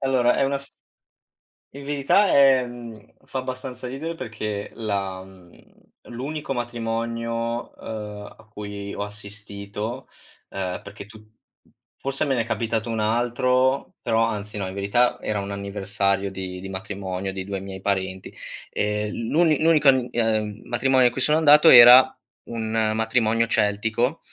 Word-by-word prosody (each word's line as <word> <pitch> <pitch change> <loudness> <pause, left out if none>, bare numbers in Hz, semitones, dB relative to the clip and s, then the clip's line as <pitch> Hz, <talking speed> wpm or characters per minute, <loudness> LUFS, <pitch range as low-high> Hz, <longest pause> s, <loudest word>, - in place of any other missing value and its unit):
Allora 130 -3 +2
è - - +2
una 140 0 0
s 140 - -12 1.0
In 140 0 -9
verità 145 +8 +2
è 135 -5 +5
mhmm, 115 -3 -11
fa 130 - -5
abbastanza 130 0 -6
ridere 160 +6 -5
perché 105 -5 -5
la 100 -4 -3
mhmm, 95 -2 -17 0.5
l'unico 140 +5 -5
matrimonio, 115 0 -3
ehm, 105 -2 -7
a - - -18
cui 100 -1 -7
ho 100 - -3
assistito, 105 +3 -7 0.4
ehm, 90 -2 -4
perché 100 0 -10
tu 110 0 -15 0.7
fosse 135 +1 -2
me 135 -3 0
n'è 115 - +1
capitato 115 0 -2
un 115 -1 -2
altro, 125 +4 +1
però, 115 0 +2
anzi 105 -2 -4
no, 95 -2 -3
in 95 - -6
verità, 100 +5 +1
era 105 -1 -2
un 100 0 -5
anniversario 100 0 -1
di 95 -1 -6
di 95 - -8
matrimonio 95 -1 -5
di 95 -1 -6
2 100 -1 -4
miei 95 -1 -8
parenti. 95 -1 -3 0.4
Ehm, 105 0 -1 0.2
l'uni 160 -1 +4
n 160 - +1
unico 155 -3 +4
an 130 -2 +4
ehm, 110 -2 -1
matrimonio 130 +1 +3
a - - 0
cui 130 - -4
sono 150 +3 +3
andato 150 +1 +7
era 125 +1 +11 0.5
un 110 -1 -1
matrimonio 115 0 +1
celtico, 110 +6 0
110 Hz, 150 wpm, -23 LUFS, 100-125 Hz, 1.0 s, era